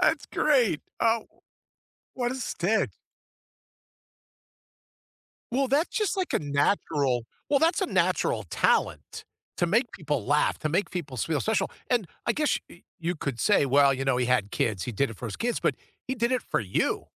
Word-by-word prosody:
That's 320 -5 +2
great. 250 - +3 0.2
Oh, 225 -1 +2 0.9
what 245 -1 -1
a - - -3
stick. 220 -4 0 2.6
Well, 270 +2 +1
that's 290 +6 +2
just 420 -4 +1
like 375 -1 -1
a - - +3
natural 140 - +1 0.3
well, 280 - +5
that's 330 +5 +2
a 380 - +1
natural - - +1
talent - - 0 0.3
to 175 - +1
make 230 +7 +2
people 145 - -2
laugh, 145 +2 +2
to 155 - -2
make 180 +6 0
people 155 -8 -5
feel 155 +5 0
special 220 0 0 0.2
and 235 -7 +2 0.2
I 235 - +3
guess 300 +4 +1
y 170 - -16 0.2
you 170 +1 -1
could 140 -6 -4
say, 205 -8 +4
well, 140 0 +5
you 135 +1 -3
know, 135 -2 +2
he 125 -1 +1
had 125 -5 +1
kids, 105 -5 -1
he 125 - -3
did 135 +7 +1
it 110 - -9
for 125 - -6
his 105 - -5
kids, 240 0 -1
but - - +1 0.3
he 260 - -1
did 235 +2 +1
it 255 - +1
for - - -1
you. 95 -4 -1
175 Hz, 180 wpm, -27 LUFS, -, 2.6 s, well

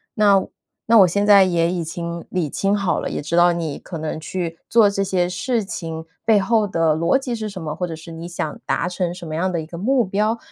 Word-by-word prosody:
那 200 -3 +4 0.4
那 225 -1 +6
我 185 - +8
现 200 +4 0
在 200 -2 +7
也 170 -2 +1
已经 170 0 -4
理 180 -5 -1
清 195 +7 0
好 195 -3 0
了， - - -3
也 - - -3
知 155 +3 -3
道 175 0 +6
你 165 -4 -3
可 170 - -8
能 155 0 -4
去 165 0 -4
做 225 -2 +6
这 195 0 0
些 185 -2 0
事 210 +5 -1
情 165 -5 -6 0.2
背 220 -2 +4
后 215 0 +2
的 165 -4 +2
逻 170 +11 +2
辑 260 -3 -4
是 215 -2 -4
什 190 -2 -8
么， 155 -2 -4
或 180 +2 -3
者 165 - -5
是 160 +1 -11
你 165 +1 -7
想 160 -3 -4
达 165 - 0
成 180 -1 -2
什 175 -2 -8
么 155 - -6
样 185 +4 0
的 170 - -1
一 155 - -5
个 170 - -10
目 245 +2 +2
标。 210 +4 0
180 Hz, 270 characters per minute, -21 LUFS, 165-205 Hz, 0.4 s, 我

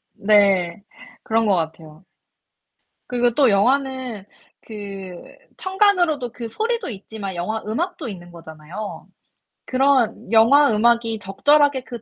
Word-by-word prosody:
네. 200 -3 +2 0.4
그런 225 0 +1
것 200 -3 +3
같아요. 160 +1 -6 1.0
그리고 245 -1 +1
또 275 -5 +4
영화는 255 0 0 0.4
그 195 -4 -8 0.4
청감으로도 360 - +1
그 235 -2 -7
소리도 450 - -3
있지만 200 -3 -7
영화 215 +6 -3
음악도 325 - -3
있는 175 -4 -9
거잖아요. 165 +5 -9 0.6
그런 260 -4 +1
영화 235 +5 +5
음악이 230 0 +2
적절하게 285 +7 +2
그 240 -3 -8
225 Hz, 250 characters per minute, -21 LUFS, 195-265 Hz, 1.0 s, 영화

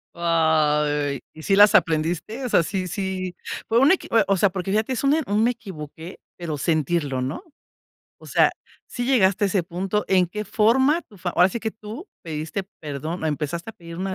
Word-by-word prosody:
Ay, 150 -4 +1
¿y 155 - -11
si 195 +5 +2
las 205 +1 +7
aprendiste? 170 +10 +1
O 245 - -2
sea, - - +4
sí 185 +3 -3
sí, 185 -1 -3 0.3
fue 230 +1 +3
una 280 +8 +6
equi - - -12 0.2
o 195 - +2
sea, 200 +2 +4
porque 185 0 -4
fíjate, 215 +5 0
es 255 - -3
un 275 +2 +4
un 210 +1 +1
"me 240 - +3
equivoqué", 170 -6 -9 0.2
pero 160 -4 -4
sentirlo, 150 -2 0
¿no? 135 - -4 0.8
O - - -15
sea, - - +3 0.3
¿sí 245 - -4
llegaste 205 -7 +3
a - - +4
ese 190 -2 +1
punto? 190 +4 -2
¿En 185 -2 +3
qué 210 +4 -5
forma 260 +11 +3
tú? 210 - -19 0.2
Ahora 180 +2 +5
sí 235 - -4
que 220 -1 -3
tú 220 - -9 0.2
pediste 160 +4 -4 0.2
perdón 155 +3 -5
o - - +1
empezaste 160 +6 -3
a - - -17
pedir 170 -4 -11
una 190 0 -2
185 Hz, 195 wpm, -23 LUFS, 160-210 Hz, 0.8 s, las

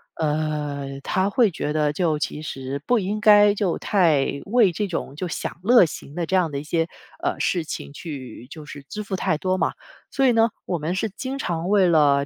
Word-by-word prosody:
呃， 150 -3 -2
他 190 +1 +1
会 230 -1 +3
觉 150 -3 -3
得 150 -1 +1
就 160 -3 0
其 150 - -3
实 135 -2 -5
不 245 -2 +3
应 205 +3 -2
该 205 -1 +6
就 195 -4 0
太 155 -8 +2
为 210 -4 +3
这 210 - -1
种 155 -5 -4
就 180 +3 -3
享 - - -4
乐 235 -3 +7
型 145 -2 -8
的 175 0 -2
这 190 - -1
样 170 -4 +2
的 140 - -3
一 - - -7
些， 165 +1 0 0.4
呃， - - -1
事 175 -3 0
情 145 - -7
去 135 -6 -8
就 155 0 -10
是 145 -1 -10
支 210 +9 -6
付 195 -1 -4
太 155 -4 0
多 185 +2 0
嘛。 - - 0 0.4
所 270 -1 +2
以 245 - +4
呢， 225 0 +4 0.2
我 175 - -1
们 160 +4 -2
是 215 +3 -1
经 260 +7 -5
常 170 -4 -2
为 200 -3 +4
了 145 -4 +4
170 Hz, 230 characters per minute, -23 LUFS, 150-200 Hz, 0.4 s, 乐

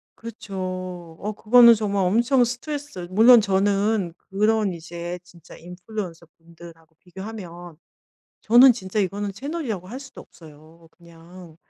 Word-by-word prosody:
그쵸. 185 -6 -7
어 210 - -4
그거는 235 +3 +6
정말 200 -3 -1
엄청 240 +7 +2
스트레스 250 - -6
물론 230 +4 +7
저는 200 -1 0 0.2
그런 210 0 +1
이제 170 +1 -7
진짜 175 -2 -17
인플루언서분들하고 170 -3 -11
비교하면 180 -3 -10 0.6
저는 245 +4 +6
진짜 210 -3 -6
이거는 200 +1 -3
채널이라고 260 - -5
할 250 +6 -8
수도 270 -1 -12
없어요. 160 +1 -18
'그냥 170 0 -16
190 Hz, 290 characters per minute, -23 LUFS, 170-225 Hz, 0.6 s, 물론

